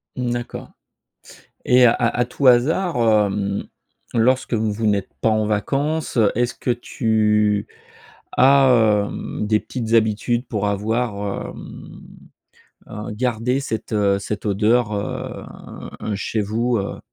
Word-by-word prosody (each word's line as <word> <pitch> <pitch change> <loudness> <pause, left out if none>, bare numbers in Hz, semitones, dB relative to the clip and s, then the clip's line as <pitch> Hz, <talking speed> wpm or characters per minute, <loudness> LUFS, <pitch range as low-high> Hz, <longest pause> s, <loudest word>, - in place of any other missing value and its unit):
Mmh, 125 -2 -2
d'accord 120 0 -5 0.9
et 125 0 +5
à 115 - +5
à 120 +1 +1
tout 130 +2 -2
hasard, 145 +8 +3
hem, 105 -3 +1 0.5
lorsque 125 +2 +2
vous 110 -1 0
vous 110 +1 -2
n'êtes 100 -2 0
pas - - +2
en 110 -1 +1
vacances, 140 +9 -1
heu, 110 -4 +4
est-ce 120 +1 0
que - - -3
tu 105 -3 +1 0.7
as, 125 -6 +5
hem, 105 - -5
des 105 0 +2
petites 115 -3 -5
habitudes 115 +2 +1
pour 105 -3 -2
avoir, 105 0 -2
hem, - - -11 0.9
heu, 105 +2 -6
gardé 125 +3 -1
cette 110 -5 -4 0.2
cette 105 +2 -5
odeur, 105 +2 +2
heu, 100 -1 -4 0.6
un 105 - -3
chez 105 +2 -2
vous, 115 +4 0
heu? 100 -1 -4
110 Hz, 130 wpm, -21 LUFS, 105-125 Hz, 0.9 s, et